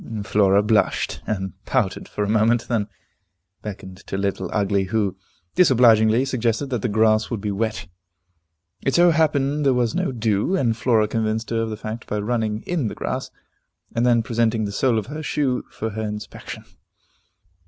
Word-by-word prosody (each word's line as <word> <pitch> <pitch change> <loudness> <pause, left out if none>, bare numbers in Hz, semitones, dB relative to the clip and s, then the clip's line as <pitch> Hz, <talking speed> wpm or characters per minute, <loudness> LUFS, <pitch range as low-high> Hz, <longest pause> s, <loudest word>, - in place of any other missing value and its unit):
Flora 100 -1 +3
blushed, 105 0 +1
and 95 -4 -2
pouted - - -1
for 105 - -3
a - - -1
moment, 110 +2 +2
then 110 -4 0 0.7
beckoned 95 -3 -8
to 95 - -3
Little 95 -2 -2
Ugly, 100 -2 +1
who 100 -1 -1 0.4
disobligingly 120 -6 +5
suggested 125 +1 -1
that 120 -4 -1
the 120 - -1
grass 110 0 +3
would 115 - -3
be 105 0 -3
wet. 110 -2 -2 1.0
It 135 - +1
so 175 0 +6
happened 150 -2 +1
there 135 -2 +3
was 120 -3 +1
no - - 0
dew, 110 - 0
and 120 -10 +1
Flora 110 -2 +2
convinced 110 +1 -2
her 115 -1 +1
of 115 - -2
the 110 - -5
fact 110 +2 -6
by 105 - -2
running 110 0 -1
in 165 -9 -1
the - - -5
grass, - - -3 0.7
and 115 - +1
then 120 -2 +3
presenting 115 -1 0
the 100 - -4
sole 120 +3 +1
of 110 - -1
her 150 +4 -6
shoe 140 -4 -1
for 110 0 -4
her 110 +2 -4
inspection. 105 -1 -6
110 Hz, 175 wpm, -22 LUFS, 105-125 Hz, 1.0 s, so